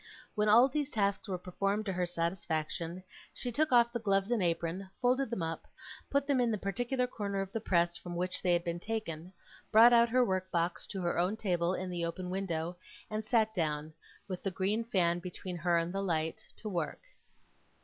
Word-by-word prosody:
When 210 0 +2
all 235 +5 +8
these 290 +1 -2
tasks 200 -4 0
were 190 -2 -2
performed 195 +4 -1
to 195 - -1
her 180 0 0
satisfaction, 170 0 -2 0.3
she 245 - -3
took 310 +5 +1
off 235 -1 +5
the 240 - -1
gloves 195 -1 +1
and 235 -4 +2
apron, 175 +2 -1
folded 255 +1 +2
them 220 -7 -2
up, 165 0 -4 0.4
put 280 0 +2
them 275 -3 +2
in 240 - +2
the 215 - 0
particular 245 +7 -1
corner 200 -5 -3
of 195 0 -3
the 225 - -3
press 175 -4 +2
from 175 -1 -7
which 180 +1 -1
they 180 - +2
had 170 0 +2
been 170 0 -2
taken, 180 -5 -4 0.4
brought 230 +2 +8
out 235 0 +6
her 250 +1 +4
work 185 -2 -1
box 170 0 -1
to 190 -3 -4
her 170 0 0
own 185 +5 +1
table 180 -3 0
in 185 0 -4
the 175 -1 -2
open 180 +2 -3
window, 175 -3 -2 0.3
and 215 0 -2
sat 220 -1 +2
down, 155 -4 -1 0.3
with 185 -3 -5
the 195 - -1
green 195 +5 0
fan 175 -6 +1
between 180 0 -6
her 170 0 +2
and 170 +2 -1
the 195 - -1
light, 160 -4 -1
to 220 - -7
work. 170 -6 -2
190 Hz, 205 wpm, -32 LUFS, 175-220 Hz, 0.4 s, all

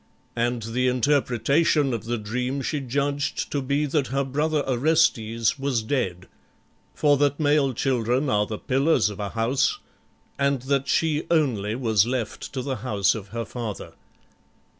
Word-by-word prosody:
And 120 0 -1
the 125 +3 0
interpretation 140 +2 +2
of 115 -1 -4
the 120 +1 -1
dream 125 +5 -3
she 150 - -1
judged 140 +2 -2
to 145 - -1
be 140 +3 0
that 145 -2 0
her 140 +1 0
brother 150 +3 0
Orestes 120 -5 +2
was 135 -5 0
dead, 95 -8 -2 0.7
for 145 -2 +3
that 145 0 +1
male 145 -2 +3
children 125 +2 0
are 105 -4 +1
the 110 - -4
pillars 135 -3 +2
of 105 - -9
a 100 -1 -3
house, 120 - +1 0.6
and 140 -2 +1
that 140 0 0
she 160 -1 +1
only 120 -11 +1
was 110 -4 +2
left 125 -3 -3
to 130 -2 -3
the 135 -1 -3
house 105 -4 +1
of 105 -3 -7
her 115 +3 -4
father. 110 -2 -6
130 Hz, 155 wpm, -24 LUFS, 115-140 Hz, 0.7 s, for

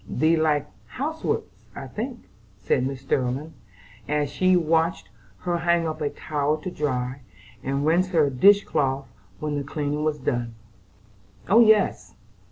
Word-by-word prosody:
"Thee 160 +2 +2
likes 150 -2 +1 0.2
housework 315 +4 -2 0.3
I - - -6
think," 240 +3 -5 0.4
said 110 +7 0
Mrs. 135 -1 -6
Sterling, 135 +4 -1 0.6
as 145 -1 0
she 185 +5 +3
watched 165 - +1 0.3
her 175 -1 -1
hang 170 0 +2
up 155 - -5
a 145 - 0
towel 150 0 -1
to 185 - -4
dry, 130 -4 -2 0.4
and 140 +2 -1
rinse 175 +4 +3
her 165 -5 +3
dish 200 +10 +6
cloth 135 0 -1 0.3
when 150 -1 -2
the - - -3
cleaning 145 +1 -3
up 150 - -1
was 155 -1 0
done. 120 -4 -2 0.9
"Oh, 210 +5 +6
yes! 205 - +3
150 Hz, 150 wpm, -24 LUFS, 135-170 Hz, 0.9 s, dish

